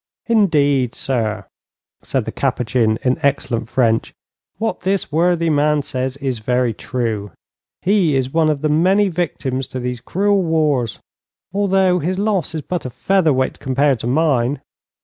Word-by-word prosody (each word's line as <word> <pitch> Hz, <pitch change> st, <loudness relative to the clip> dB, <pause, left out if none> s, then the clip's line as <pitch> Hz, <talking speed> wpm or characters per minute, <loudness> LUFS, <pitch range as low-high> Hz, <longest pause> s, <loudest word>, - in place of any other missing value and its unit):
'Indeed, 145 Hz, -, +2 dB
sir,' 110 Hz, -6 st, -2 dB, 0.6 s
said 130 Hz, -5 st, -2 dB
the 110 Hz, -, -4 dB
Capuchin, 120 Hz, -4 st, 0 dB
in 125 Hz, 0 st, +1 dB
excellent 125 Hz, -5 st, 0 dB
French, 115 Hz, -4 st, +1 dB, 0.4 s
'what 225 Hz, +2 st, -2 dB
this 190 Hz, -1 st, -1 dB
worthy 170 Hz, +1 st, +2 dB
man 150 Hz, 0 st, +2 dB
says 130 Hz, 0 st, -3 dB
is 135 Hz, -4 st, -3 dB
very 125 Hz, +1 st, 0 dB
true. 110 Hz, -3 st, -3 dB, 0.5 s
He 185 Hz, -6 st, +3 dB
is 130 Hz, 0 st, -1 dB
one 160 Hz, -1 st, +3 dB
of 150 Hz, -1 st, -1 dB
the 155 Hz, -, +2 dB
many 190 Hz, +6 st, +3 dB
victims 140 Hz, -7 st, -2 dB
to 130 Hz, -, -6 dB
these 125 Hz, -1 st, -4 dB
cruel 200 Hz, +8 st, +1 dB
wars, 150 Hz, -, 0 dB, 0.6 s
although 190 Hz, -2 st, +2 dB
his 180 Hz, +4 st, -2 dB
loss 200 Hz, -5 st, 0 dB
is 155 Hz, -, -4 dB
but 180 Hz, -1 st, -3 dB
a 130 Hz, -, -4 dB
feather 165 Hz, +7 st, +1 dB
weight 130 Hz, -1 st, 0 dB
compared 135 Hz, -1 st, +1 dB
to 115 Hz, -, -4 dB
mine. 135 Hz, -2 st, +1 dB
140 Hz, 150 wpm, -19 LUFS, 125-175 Hz, 0.6 s, He